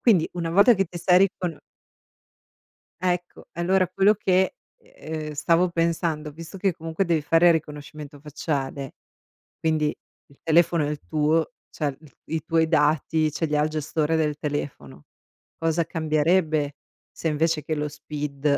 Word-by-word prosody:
quindi 190 -9 +4
una 170 -2 -3
volta 200 +7 +6
che 195 0 +1
ti 175 +1 -8
sei 180 +1 +5
ricono 175 -4 -5 1.4
Ecco, 180 -1 -2
e 170 - -6
allora 185 0 +2
quello 195 +3 +4
che, 190 -2 +1 0.2
ehm, 160 - -7
stavo 165 +4 +2
pensando, 165 -2 -1
visto 165 +5 -10
che 195 0 +1
comunque 165 +3 -2
devi 165 -3 +1
fare 165 +4 +5
riconoscimento 150 -2 -4
facciale, 140 -2 -4 0.7
quindi 155 -2 +1 0.4
il 140 - -23
telefono 165 -1 +3
è - - -2
il 150 -1 -4
tuo, 155 +4 +1 0.2
cioè 145 -4 -3
i 155 - -16 0.3
i 155 - -2
tuoi 165 -1 +2
dati 155 0 +2
ce 165 - -1
li 150 -1 -1
ha 150 - +3
il 155 - 0
gestore 155 +1 -1
del 150 -2 0
telefono, 130 - -5 0.5
cosa 165 +1 +1
cambierebbe 155 -1 +1 0.4
se 165 - -4
invece 155 0 0
che 155 - -2
lo 150 0 -2
SPID 145 -1 -2
160 Hz, 150 wpm, -24 LUFS, 150-170 Hz, 1.4 s, volta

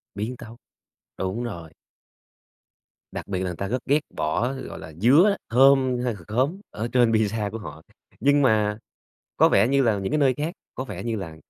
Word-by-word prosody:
Biến 115 +5 -4
tấu. 115 +1 -11 0.6
Đúng 95 +6 -2
rồi. 85 -9 -7 1.4
Đặc - - -6
biệt 95 -2 -2
là 95 - -2
người 90 - -3
ta 100 +3 -4
rất 125 +3 -3
ghét 145 +3 +3 0.2
bỏ, 115 - -1
gọi 130 - -8
là, 80 -1 -10
dứa, 145 - +5
thơm 130 +1 +4
hay 120 - 0
c - - -11
khóm 135 - 0
ở 115 +3 -4
trên 120 -2 +4
pizza 110 -1 0
của 115 - -5
họ. 105 - -9 0.4
Nhưng 145 +1 +3
mà 105 -5 +2 0.6
có - - +6
vẻ 120 - +4
như 140 0 +3
là 110 -4 +2
những 95 0 -3
cái 155 - +2
nơi 135 -3 +3
khác, 155 +5 -3 0.2
có 130 - -4
vẻ 100 -6 -7
như 115 -1 -2
là 85 -6 -7
115 Hz, 200 wpm, -24 LUFS, 100-130 Hz, 1.4 s, có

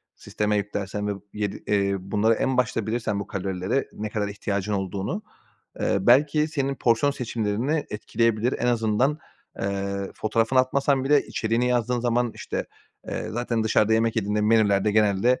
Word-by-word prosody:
sisteme 105 0 -1
yüklersen 105 0 -3
ve 105 - 0 0.2
yedi 105 -1 -3
eee, 100 -1 +2
bunları 105 +4 +1
en 130 +3 0
başta 115 -3 0
bilirsen, 110 -3 -1
bu 100 - -5
kalorilere 95 +6 -2
ne 105 0 -4
kadar 105 -1 -2
ihtiyacın 100 0 -3
olduğunu, 100 - -3 0.6
eee, - - +1
belki 145 +8 +4
senin 140 -3 -1
porsiyon 120 +4 +2
seçimlerini 120 +3 -1
etkileyebilir. 115 +2 0
En 120 - 0
azından, 120 +5 +1 0.4
eee, 100 0 -2
fotoğrafını 115 +4 +1
atmasan 135 +1 +2
bile 145 +1 +4
içeriğini 115 +2 0
yazdığın 125 0 +1
zaman, 120 -1 +1
işte, - - -4 0.4
eee, - - -3
zaten 120 -1 -1
dışarıda 110 0 +3
yemek 115 0 +1
yediğinde 105 0 0
menülerde 105 -1 +3
genelde, 110 +3 +3
110 Hz, 150 wpm, -25 LUFS, 105-125 Hz, 0.6 s, belki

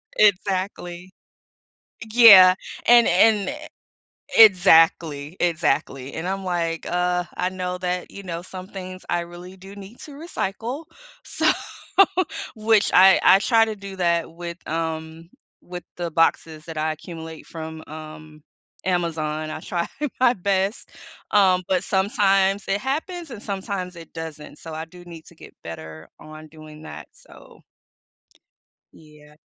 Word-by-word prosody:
Exactly. 185 -3 0 1.0
Yeah. 195 -6 +9 0.3
And 240 -1 +7
and 200 +2 +3
e - - -5 0.8
Exactly, 165 -6 +5
exactly, 140 -5 -1
and 165 +3 -5
I'm 195 0 -3
like, 170 -2 -2
"Ugh, 180 0 0
I 180 - -1
know 180 -1 -5
that," 180 0 -3
you 200 - -9
know, 175 -2 -6
"some 185 0 -9
things 185 -2 -9
I 175 0 0
really 175 +2 -11
do 195 +2 -13
need 200 +4 -12
to 300 - -11
recycle." 280 - -5 0.4
So - - -1 1.1
Which 215 -1 +2
I 190 +1 +7
I 190 - +7
try 225 +1 +3
to 220 -1 -5
do 195 -1 -9
that 170 -2 0
with, 170 +1 -8
um 160 0 -4 0.3
with 175 -1 -9
the 170 -2 -4
boxes 160 -1 0
that 160 -2 -8
I 155 +1 0
accumulate 160 0 -10
from, 160 -1 -8
um, 155 0 -11 0.4
Amazon. 155 -4 -2
I 155 - -6
try 170 -1 -3 0.3
my 255 -1 +4
best, 195 +1 -2 0.4
um, 185 -3 +4
but 185 -2 0
sometimes 195 -1 +1
it 195 +1 0
happens 320 +4 -4
and 215 -3 -9
sometimes 190 -2 -5
it 165 -1 -13
doesn't. 155 -2 -8
So, 160 -1 -9
I 160 +1 -5
do 175 +2 -15
need 165 -2 -12
to 170 - -17
get - - -15
better 80 -1 -9
on 155 0 -12
doing 155 0 -13
that. - - -10
So - - -18 1.3
Yeah. 150 -1 -18
180 Hz, 140 wpm, -22 LUFS, 160-195 Hz, 1.3 s, Yeah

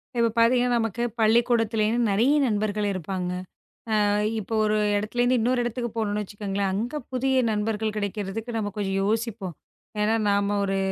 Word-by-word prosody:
இப்ப 235 -1 +3
பாத்தீங்கன்னா, 245 +1 +4
நமக்கு 225 +1 -2 0.2
பள்ளிக்கூடத்தில 225 0 +3
இருந்து 230 0 +1
நெறைய 240 +9 +3
நண்பர்கள் 210 -1 0
இருப்பாங்க. 185 0 -3 0.7
ஆ, - - +2 0.3
இப்போ 215 +2 -6
ஒரு 215 0 +1 0.2
இடத்துல 215 +4 -1 0.2
இன்னொரு 245 +2 +1
இடத்துக்கு 240 0 -3
போனும் 210 -2 0
வெச்சுக்கோங்களேன். 200 -1 -3
அங்க 235 +9 -2
புதிய 265 +1 0 0.2
நண்பர்கள் 215 0 -1
கிடைக்கறதுக்கு 210 +3 -4
நம்ம 210 -2 -1
கொஞ்சம் 195 -2 -1
யோசிப்போம். 215 -4 -2 0.5
என்னா, 215 +2 +2
நாம 200 0 +1
ஒரு 195 0 0
215 Hz, 145 wpm, -25 LUFS, 205-235 Hz, 0.7 s, பாத்தீங்கன்னா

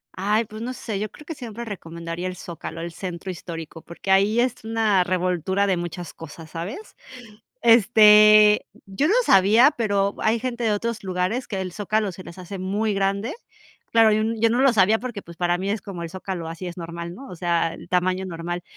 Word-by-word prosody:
Ay, 210 +4 +1
pues, 215 +1 -10
no 250 +2 -4
sé, 220 -5 -5
yo 210 +1 -3
creo 300 - -15
que 325 - -5
siempre 235 -5 -7
recomendaría 170 -3 -6
el 185 - -5
Zócalo, 165 -2 -8
el 170 +1 -5
Centro 180 +1 -6
Histórico, 165 -2 -8
porque 170 +4 -5
ahí 200 +4 +4
es 245 -2 0
una 220 -4 +2
revoltura 185 +1 0
de 195 -2 +1
muchas 175 0 -6
cosas, 160 0 -11
¿sabes? 190 - -7 0.7
Este, 215 -2 +7 0.2
yo 195 +10 0
no 385 - +3
sabía, 210 +8 +6
pero 200 -3 0
hay 225 +2 +2
gente 240 0 -3
de 220 - +2
otros 230 +1 -3
lugares 185 +7 -1
que 195 -3 -4
el 185 -1 -4
Zócalo 210 +1 -1
se 185 +1 -11
les 170 - -11
hace 185 +2 -7
muy 205 +3 -1
grande. 200 +5 -1 0.6
Claro, 225 -1 +6
yo 215 - +2
n 225 +1 -1
yo 230 - +4
no 240 +2 +1
lo 270 -2 +5
sabía 215 +1 +3
porque, 240 -5 -5
pues, 170 -3 -13
para 175 0 0
mí 190 +2 -3
es 210 +1 -2
como 185 -4 -7
el 165 - -6
Zócalo, 185 -2 -5
así 165 +3 -7
es 175 - -9
normal, 170 0 -6
¿no? 270 +7 -11
O - - -8
sea, 170 -1 0
el - - -12
tamaño 185 +1 0
normal. 175 0 -5
195 Hz, 210 wpm, -23 LUFS, 175-220 Hz, 0.7 s, Este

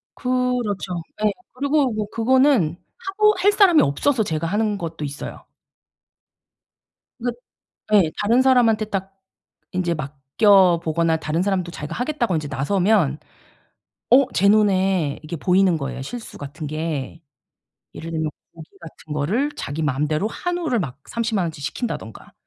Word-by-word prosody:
그렇죠. 245 -8 -1 0.2
예. 210 - +4 0.2
그리고 280 0 +1
뭐 215 -1 -2
그거는 235 - +3 0.3
하고 425 +2 +3
할 400 +3 +4
사람이 390 -6 +5
없어서 220 - +1
제가 165 -4 -2
하는 210 +2 0
것도 165 -3 -6
있어요. 140 0 -7 1.7
그 245 +1 -1 0.6
예 190 -6 +5
다른 230 +5 +3
사람한테 240 -5 +4
딱 195 -2 -4 0.6
인제 180 -2 0
맡겨 165 +6 +3
보거나 165 0 +1
다른 160 +1 -2
사람도 185 -3 -1
자기가 150 -3 -6
"하겠다."고 245 - -1
인제 155 -2 -2
나서면 155 +2 +1 0.9
어 265 +2 +7
제 200 - +4
눈에 190 -7 +2
이게 165 +2 -5
보이는 180 +1 +3
거예요 135 -2 -5
실수 225 - -8
같은 145 +2 -7
게. 155 -1 -4 0.7
예를 165 - -7
들면 160 -1 -1 0.3
고기 160 -1 -12
같은 160 -2 -11
거를 205 - 0
자기 145 +3 -4
마음대로 150 +4 0
한우를 345 -4 -2
막 140 -5 -6
300,000 225 -5 -1
원어치 160 -3 -5
시킨다든가 150 - -5
185 Hz, 285 characters per minute, -22 LUFS, 155-235 Hz, 1.7 s, 어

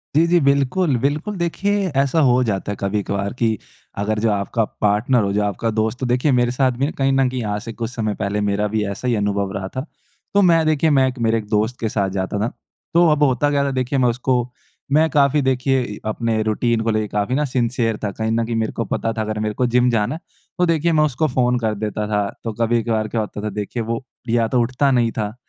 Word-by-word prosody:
जी, 160 +2 +5
जी। 175 +1 +4
बिल्कुल, 140 +3 +2
बिल्कुल। 150 - -1
देखिए 195 +3 0
ऐसा 140 +4 +1
हो 125 +1 +4
जाता 100 -3 -2
है - - -3
कभी-कभार 100 0 -2
कि 110 -2 +1 0.5
अगर 105 +1 -1
जो 110 0 +2
आपका 105 +3 0 0.2
पार्टनर 110 +4 +2
हो 100 - 0
जो 105 +1 +1
आपका 105 +3 -1
दोस्त 110 +2 -1
तो 130 - -2
देखिए 125 +4 +2
मेरे 120 -1 +2
साथ 130 +1 +2
भी 135 - +1
ना 150 - -2
कहीं 135 0 +2
न 135 -1 +3
कहीं 130 0 -3
यहाँ 105 -2 -2
से 115 - -6
कुछ 115 -1 -4
समय 110 -4 -2
पहले 100 +1 -1
मेरा 105 +1 0
भी 110 0 -1
ऐसा 100 +6 -5
ही 120 - +2
अनुभव 100 -1 -1
रहा 95 -1 -3
था। 130 +2 -3 0.5
तो 200 - +5
मैं 165 -4 +4
देखिए, 155 0 +2
मैं 135 -3 +4
एक 130 -1 -5
मेरे 115 0 +2
एक 105 - -5
दोस्त 110 +3 0
के 110 - -1
साथ 100 -2 0
जाता 95 +2 -2
था। 110 +3 -1 0.4
तो 170 0 +5
अब 150 -1 +2
होता 145 +1 +2
क्या 140 -1 +2
था 140 - 0
देखिए 130 +1 -1
मैं 125 - +4
उसको 125 0 0 0.4
मैं 155 +3 +4
काफ़ी 145 0 +3
देखिए 130 0 +1
इ 105 -4 -6
अपने 110 0 -1
रूटीन 110 +1 0
को 115 - 0
लेके 110 -1 0
काफ़ी 105 +5 -1
ना 150 +2 +1
सिंसियर 120 -3 0
था। 105 - -1
कहीं 110 +2 -2
न 115 0 +1
कहीं 115 0 -3
मेरे 110 -1 0
को 115 - -2
पता 115 - -2
था 110 - -3
अगर 110 0 -3
मेरे 105 0 -1
को 125 - +1
जिम 125 +1 +3
जाना 110 +3 0
है - - -8 0.4
तो 180 - +4
देखिए 165 0 +2
मैं 155 -2 +3
उसको 150 +1 +1
फ़ोन 125 -2 +1
कर 110 -2 -1
देता 105 0 -3
था 105 -1 0 0.2
तो 115 - -3
कभी-कभार 115 -1 +1
क्या 110 +1 -1
होता 105 -1 -5
था 105 - -1
देखिए 105 +3 -4
वो 115 +2 -3 0.3
या 115 0 +2
तो 125 - +1
उठता 130 +4 +1
नहीं 120 -3 +2
था 105 0 -2
120 Hz, 245 wpm, -20 LUFS, 110-135 Hz, 0.5 s, जी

